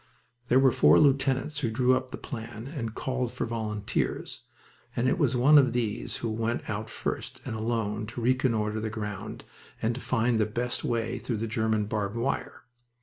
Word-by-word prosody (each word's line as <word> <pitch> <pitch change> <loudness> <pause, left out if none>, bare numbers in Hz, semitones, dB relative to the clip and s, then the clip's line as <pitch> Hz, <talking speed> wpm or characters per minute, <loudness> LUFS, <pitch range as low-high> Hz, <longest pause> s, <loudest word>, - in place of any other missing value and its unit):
There 125 - +4
were 135 -1 +5
four - - +6
lieutenants 140 +1 +2
who 125 -6 0
drew 125 +3 +3
up 130 0 -2
the - - -6
plan 115 -2 -7
and 120 -6 -5
called 125 -2 -2
for - - -2
volunteers, 110 -3 -2 0.5
and 120 - +1
it 155 - +1
was 130 -5 +2
one 145 +5 +7
of 130 -4 +3
these 115 -2 -1
who 115 - 0
went 115 +2 -2
out 110 +1 -3
first - - -4
and - - -3
alone 110 -1 -1
to 120 +2 -6
reconnoiter 115 -4 +1
the 110 0 -2
ground 105 -3 -5 0.4
and 115 +2 +1
to 125 - -6
find 120 -2 +1
the 110 - +2
best 120 +3 -2
way 115 -1 -1
through 120 - -3
the 110 - -2
German 110 -1 0
barbed 105 0 -2
wire. 120 +4 -2
115 Hz, 185 wpm, -28 LUFS, 110-130 Hz, 0.5 s, one